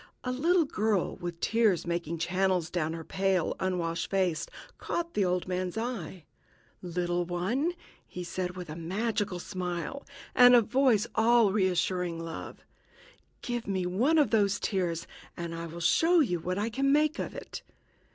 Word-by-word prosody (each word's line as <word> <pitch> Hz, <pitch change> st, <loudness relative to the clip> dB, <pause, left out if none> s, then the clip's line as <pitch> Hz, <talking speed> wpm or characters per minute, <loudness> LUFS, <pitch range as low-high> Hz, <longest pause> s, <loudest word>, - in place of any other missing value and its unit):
A 250 Hz, -, -2 dB
little 330 Hz, +6 st, +3 dB
girl, 215 Hz, -7 st, 0 dB
with 175 Hz, -2 st, -6 dB
tears 220 Hz, -5 st, +2 dB
making 170 Hz, -1 st, -2 dB
channels 180 Hz, 0 st, 0 dB
down 160 Hz, -3 st, -1 dB
her 165 Hz, -1 st, -6 dB
pale, 190 Hz, -1 st, 0 dB
unwashed 170 Hz, -3 st, -1 dB
face, 185 Hz, -5 st, 0 dB, 0.3 s
caught 340 Hz, 0 st, -3 dB
the 205 Hz, -, +2 dB
old 180 Hz, -1 st, 0 dB
man's 185 Hz, +2 st, -2 dB
eye. 195 Hz, -8 st, -4 dB, 0.6 s
"Little 175 Hz, 0 st, -1 dB
one," 195 Hz, -, -1 dB, 0.3 s
he 180 Hz, -, -6 dB
said, 180 Hz, 0 st, -4 dB
with 180 Hz, -1 st, -6 dB
a 155 Hz, -, -7 dB
magical 195 Hz, +3 st, -2 dB
smile, 180 Hz, +8 st, -4 dB, 0.3 s
and 245 Hz, 0 st, +8 dB
a 240 Hz, -, +7 dB
voice 240 Hz, -1 st, +3 dB
all 225 Hz, -3 st, +4 dB
reassuring 180 Hz, -3 st, 0 dB
love, 165 Hz, -1 st, -7 dB, 0.8 s
"give 240 Hz, -3 st, -3 dB
me 190 Hz, -2 st, -1 dB
one 235 Hz, -, +2 dB
of 295 Hz, -, +3 dB
those 200 Hz, -3 st, +2 dB
tears, 175 Hz, -5 st, -1 dB, 0.3 s
and 170 Hz, -1 st, -4 dB
I 165 Hz, 0 st, -5 dB
will 165 Hz, +1 st, -8 dB
show 325 Hz, -, +4 dB
you 180 Hz, -, +2 dB
what 180 Hz, +3 st, -3 dB
I 215 Hz, +3 st, -1 dB
can 275 Hz, +4 st, +1 dB
make 305 Hz, +2 st, +2 dB
of -, -, -4 dB
it." -, -, -7 dB
185 Hz, 160 wpm, -29 LUFS, 175-230 Hz, 0.8 s, and